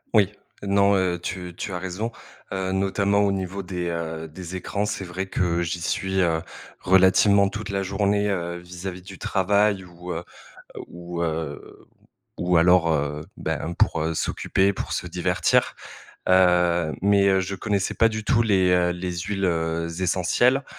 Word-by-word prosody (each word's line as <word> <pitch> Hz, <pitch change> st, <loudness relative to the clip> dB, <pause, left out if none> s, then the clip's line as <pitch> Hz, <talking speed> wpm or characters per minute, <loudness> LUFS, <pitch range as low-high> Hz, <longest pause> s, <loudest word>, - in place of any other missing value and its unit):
Oui. 100 Hz, -2 st, +5 dB, 0.3 s
Non, 100 Hz, 0 st, +3 dB
heu, 90 Hz, -2 st, +1 dB
tu 90 Hz, -1 st, -5 dB
tu 100 Hz, -, -5 dB
as 90 Hz, -, -3 dB
raison, 95 Hz, +5 st, -4 dB, 0.4 s
heu, 95 Hz, -1 st, -2 dB
notamment 100 Hz, +1 st, +1 dB
au 100 Hz, -1 st, +3 dB
niveau 95 Hz, 0 st, -3 dB
des, 90 Hz, -1 st, -4 dB
heu, 80 Hz, -1 st, -4 dB
des 90 Hz, +3 st, -8 dB
écrans, 100 Hz, +3 st, -2 dB
c'est 105 Hz, -2 st, -3 dB
vrai 95 Hz, +2 st, -4 dB
que 85 Hz, -2 st, 0 dB
j'y 85 Hz, 0 st, -2 dB
suis, 95 Hz, +3 st, -1 dB
heu, 85 Hz, -3 st, +2 dB, 0.4 s
relativement 95 Hz, +2 st, +5 dB
toute 105 Hz, +1 st, -6 dB
la 100 Hz, -1 st, -1 dB
journée. 100 Hz, +1 st, +1 dB
Heu 85 Hz, -3 st, -2 dB
vis-à-vis 90 Hz, +1 st, -7 dB
du 95 Hz, 0 st, -10 dB
travail 100 Hz, 0 st, +1 dB
ou, 90 Hz, 0 st, -9 dB
heu -, -, -2 dB, 0.6 s
heu, -, -, -4 dB
ou, 85 Hz, 0 st, -6 dB
heu, 80 Hz, -3 st, -5 dB, 0.5 s
ou 90 Hz, 0 st, +2 dB
alors, 85 Hz, -1 st, +5 dB
heu, 75 Hz, 0 st, -1 dB, 0.2 s
ben 85 Hz, -, -3 dB
pour, 85 Hz, -, +1 dB
heu, 80 Hz, +1 st, -1 dB
s'occuper 95 Hz, +4 st, 0 dB
pour -, -, -5 dB
se -, -, -2 dB
divertir. -, -, +1 dB, 0.6 s
Heu, 90 Hz, -3 st, +4 dB
mais, 100 Hz, 0 st, +4 dB
heu, 95 Hz, -1 st, +3 dB
je 95 Hz, +1 st, -4 dB
connaissais 100 Hz, 0 st, -1 dB
pas 115 Hz, -, +4 dB
du 110 Hz, -1 st, -4 dB
tout 115 Hz, +1 st, +3 dB
les, 95 Hz, -5 st, +3 dB
heu, 90 Hz, -1 st, +3 dB
les 90 Hz, 0 st, -4 dB
huiles, 95 Hz, +2 st, -2 dB
heu, 85 Hz, -1 st, 0 dB
essentielles, 95 Hz, +9 st, +2 dB
95 Hz, 165 wpm, -24 LUFS, 85-100 Hz, 0.6 s, Oui